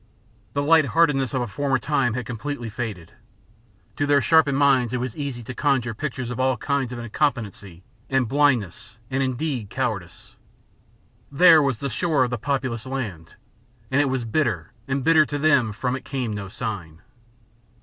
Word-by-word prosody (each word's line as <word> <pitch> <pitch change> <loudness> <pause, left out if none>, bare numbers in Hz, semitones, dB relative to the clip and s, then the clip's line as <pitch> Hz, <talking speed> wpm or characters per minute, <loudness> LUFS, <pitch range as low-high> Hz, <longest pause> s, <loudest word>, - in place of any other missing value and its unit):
The 140 - 0
lightheartedness 150 -3 +3
of 125 - +1
a - - -4
former 135 +4 0
time 130 -4 0
had 125 -2 -3
completely 120 0 -5
faded. 105 -7 -5 0.9
To 145 - 0
their 145 0 +5
sharpened 140 +1 +4
minds 135 -4 +3
it 125 - 0
was 125 -2 -4
easy 140 -5 -5
to 130 - -7
conjure 130 -5 0
pictures 125 -1 -4
of 125 - -5
all 130 -1 +2
kinds 140 -1 -1
of 125 - -5
incompetency 110 - -3 0.3
and 135 -3 +1
blindness 125 - 0
and, 135 +1 0
indeed, 130 -4 -2
cowardice. 100 -10 -4 1.0
There 165 +2 +7
was 135 -5 0
the 140 +4 -3
shore 155 +2 +1
of 125 - -2
the 120 - -2
populous 130 -3 -2
land, 105 -12 -5 0.6
and 140 +2 +3
it - - +2
was 130 -2 -2
bitter 110 - -1 0.2
and 135 0 -1
bitter 160 0 +6
to 145 - -3
them 140 -5 +3
that 105 - -5
from 125 +3 -1
it 130 - -7
came 125 -5 -3
no 100 -1 -5
sign. 95 -7 -6
130 Hz, 170 wpm, -23 LUFS, 115-140 Hz, 1.0 s, There